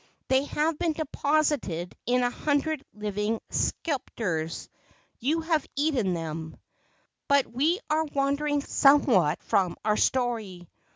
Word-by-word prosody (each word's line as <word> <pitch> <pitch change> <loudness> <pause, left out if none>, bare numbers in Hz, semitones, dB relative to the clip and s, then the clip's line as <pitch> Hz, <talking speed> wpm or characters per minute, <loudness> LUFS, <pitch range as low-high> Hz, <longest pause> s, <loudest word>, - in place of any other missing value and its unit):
They 265 +1 +3
have 300 +1 -1
been 335 -2 +1
deposited 290 - -1
in 250 +1 +3
a 245 - +1
hundred 295 +1 -1
living 210 +1 -2
sepulchres. 180 - -2 0.5
You 305 +7 0
have 320 -3 0
eaten 270 - +1
them!" 160 -1 -5 0.7
But 280 -1 +4
we 305 - 0
are 315 +1 +1
wandering 285 0 0
somewhat 240 - +4
from 185 -3 +1
our 210 0 +2
story. 220 -9 -1
265 Hz, 115 wpm, -27 LUFS, 200-300 Hz, 0.7 s, But